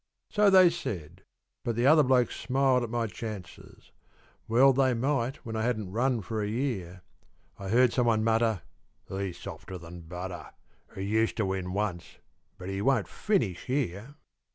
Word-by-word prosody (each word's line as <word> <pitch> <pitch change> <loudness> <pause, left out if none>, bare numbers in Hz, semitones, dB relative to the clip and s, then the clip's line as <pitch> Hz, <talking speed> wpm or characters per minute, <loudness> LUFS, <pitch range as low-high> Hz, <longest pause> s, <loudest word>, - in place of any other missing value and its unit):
So 210 -1 +4
they 185 -3 +7
said; 90 - -6 0.4
but 115 - -1
the 120 +2 +1
other 155 +3 +7
blokes 130 -3 +2
smiled 130 -1 +2
at 120 - -3
my 120 0 -1
chances, 105 -2 -9 0.6
Well 130 +4 +5
they 130 -1 +2
might 130 +1 0
when 115 -1 -5
I 110 - -1
hadn't 110 -5 -1
run 120 +2 +1
for 110 +3 -3
a 105 - -1
year; 105 -7 -3 0.6
I 100 -1 -6
heard 120 +2 +4
someone 115 -3 +2
mutter, 110 -5 +1 0.5
"He's 95 -2 -4
softer 95 - -8
than 85 0 -10
butter 90 +2 -7 0.4
He 95 - -4
used 110 +3 +1
to 110 - +1
win 95 -1 -2
once, 100 -4 -3 0.4
but 90 - -8
he 95 0 -3
won't 115 -6 +2
finish 145 - -1
here." 125 -1 -2
115 Hz, 160 wpm, -28 LUFS, 95-130 Hz, 0.6 s, they